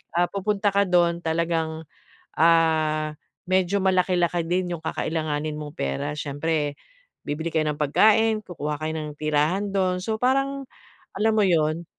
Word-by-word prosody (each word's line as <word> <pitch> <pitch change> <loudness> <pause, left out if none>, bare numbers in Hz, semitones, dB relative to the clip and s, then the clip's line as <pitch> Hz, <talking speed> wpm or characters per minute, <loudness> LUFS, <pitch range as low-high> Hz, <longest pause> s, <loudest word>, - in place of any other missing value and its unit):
ah, 175 +1 +3
pupunta 205 +1 0
ka 200 - +5
do'n 175 -2 +2
talagang, 160 -1 -1 0.5
ah, 155 -2 +3 0.3
medyo 185 +1 +1
malaki-laki 180 -2 +2
din 180 +1 -1
'yong 165 - -7
kakailanganin 155 -2 -2
mong 150 -1 -8
pera. 70 - -2
Siyempre 150 0 -2 0.5
bibili 160 +3 -3
kayo 155 -1 +1
ng 150 - -12
pagkain, 215 +8 +3
kukuha 150 -4 -4
kayo 155 0 -2
ng 150 -1 -6
tirahan 155 +7 0
do'n. 185 -2 +1
So, 220 +3 -2
parang, 275 +2 0 0.5
alam 220 +1 +2
mo 215 - +4
'yon? 160 -1 +1
170 Hz, 140 wpm, -24 LUFS, 155-190 Hz, 0.5 s, ka